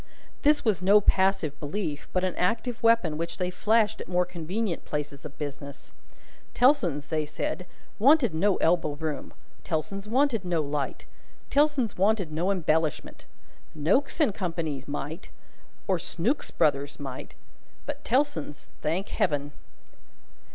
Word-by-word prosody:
This 295 -1 +3
was 210 -5 +2
no 200 +3 +6
passive 190 -7 +2
belief, 150 -1 -4
but 185 - 0
an 185 -1 0
active 225 +5 -1
weapon 225 -10 +3
which 170 0 -3
they 180 -1 -1
flashed 215 +3 +2
at - - -7
more 180 0 +2
convenient 180 +3 -3
places 150 -1 -5
of 150 -1 -9
business. 140 -1 -7 0.6
Tellson's 175 - +3
(they 155 -1 0
said) 155 +4 -4 0.3
wanted 260 - +5
no 195 +5 +2
elbow 165 -3 +2
room, 150 -2 -4 0.3
Tellson's 170 +6 -3
wanted 245 -2 +2
no 175 -2 0
light, 145 -1 -3 0.5
Tellson's 285 -8 +2
wanted 195 -4 +2
no 170 +5 0
embellishment. 160 -5 0 0.5
Noakes 200 - +1
and 290 -10 +3
Co.'s 165 -8 -3
might, 145 +4 -5 0.6
or 185 -3 +2
Snooks 220 - -1
Brothers' 140 -1 0
might; 135 -3 -7 0.5
but 290 0 -5
Tellson's, 240 - -1
thank 165 +6 -1
Heaven 145 -4 0
180 Hz, 130 wpm, -27 LUFS, 150-215 Hz, 0.6 s, no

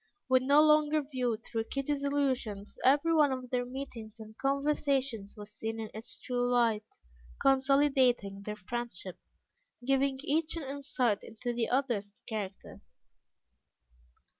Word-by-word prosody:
When 260 0 +3
no 290 +2 +7
longer 305 0 +4
viewed 250 -5 -2
through 225 -1 -2
Kitty's 280 +3 -2
illusions, 260 -8 -1
every 290 +5 +4
one 300 -3 +5
of 255 -1 -5
their 245 -1 0
meetings 245 -4 -8
and 220 0 -11
conversations 275 -6 0
was 210 0 -9
seen 225 +1 -4
in 220 -1 -5
its 220 +2 -5
true 245 0 -1
light, 225 -3 +1 0.4
consolidating 265 -6 +3
their 210 +1 -5
friendship, 210 -3 -5 0.7
giving 270 0 +2
each 320 +2 0
an 325 - -4
insight 270 -5 -1
into 240 +2 -5
the 235 -1 -1
other's 235 -6 -1
character. 205 -4 -6
255 Hz, 130 wpm, -31 LUFS, 220-280 Hz, 0.7 s, no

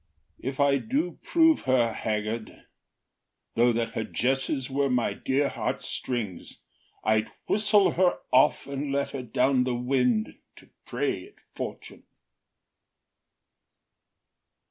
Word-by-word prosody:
If 135 +2 -5
I 140 -1 +4
do 275 - -2
prove 325 -2 +4
her 120 -3 +2
haggard, 110 +1 -4 0.9
Though 120 +1 +4
that 115 0 -1
her 110 - -2
jesses 135 +2 0
were 140 0 0
my 125 -2 +1
dear 140 +2 0
heartstrings, 110 -11 -4 0.4
I’d 110 0 +2 0.2
whistle 210 -1 +3
her 180 0 +2 0.2
off, 130 - +4
and 140 +1 -4
let 140 0 -1
her 135 - -4
down 125 +2 +2
the 125 -1 -1
wind 125 -3 0 0.2
To - - -18 0.2
prey - - -2
at - - -21 0.2
fortune. - - -7
130 Hz, 115 wpm, -27 LUFS, 115-140 Hz, 0.9 s, I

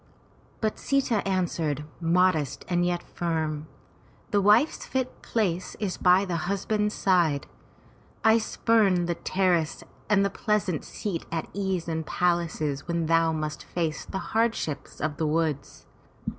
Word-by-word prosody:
But 215 -1 -1
Sita 275 -5 +1
answered, 165 -6 -1
modest 170 -4 +2
and 175 -1 +1
yet 175 0 0
firm, 155 -3 -2 0.6
"The 205 - +3
wife's 215 +10 +4
fit 260 -1 -3
place 185 -6 -1
is 200 -4 -2
by 185 +2 +5
the 175 -1 -2
husband's 210 +2 0
side. 170 -7 +2 0.8
I 220 +1 +6
spurn 210 -5 +2
the 170 - 0
terrace 175 -2 0 0.3
and 200 -1 +4
the 200 - 0
pleasant 205 -7 0
seat 190 -6 -4
at 165 -1 -2
ease 190 -4 -2
in 160 -1 -2
palaces 165 -4 0
when 170 -1 0
thou 165 0 +3
must 155 -1 -3
face 160 -3 -2
the - - -5 0.2
hardships 225 -10 -1
of 150 -1 -2
the 160 - 0
woods. 155 -2 -1
175 Hz, 135 wpm, -27 LUFS, 160-200 Hz, 0.8 s, I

